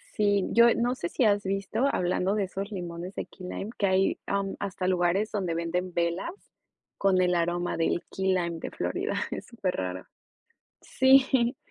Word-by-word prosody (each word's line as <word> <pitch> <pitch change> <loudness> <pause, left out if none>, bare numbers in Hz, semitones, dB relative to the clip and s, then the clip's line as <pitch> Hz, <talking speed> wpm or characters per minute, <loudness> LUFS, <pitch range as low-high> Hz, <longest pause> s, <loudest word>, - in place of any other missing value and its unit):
Sí, 205 -3 +2
yo, 235 +1 +7
eh, 235 - +4
no 245 +2 +1
sé 170 -9 -4
si 255 - 0
has 205 -2 +3
visto, 195 +5 -1
hablando 185 +2 0
de 210 - +1
esos 195 +2 -5
limones 175 -1 -6
de - - -3
key 185 -2 -11
lime, 195 +3 -5
que 200 - +1
hay, 190 0 +2
am, 200 -1 -1
hasta 190 -2 -3
lugares 185 +3 +1
donde 185 -5 -1
venden 180 +2 -2
velas 170 - -1 0.7
con 190 -2 +3
el 180 -1 +2
aroma 175 +1 0
del 165 +1 0
key 190 0 -2
lime 170 -2 -1
de - - -6
Florida, - - -2 0.2
es - - -5
superraro. 95 - -3 0.8
Sí, 260 -2 +4
190 Hz, 175 wpm, -27 LUFS, 175-205 Hz, 0.8 s, yo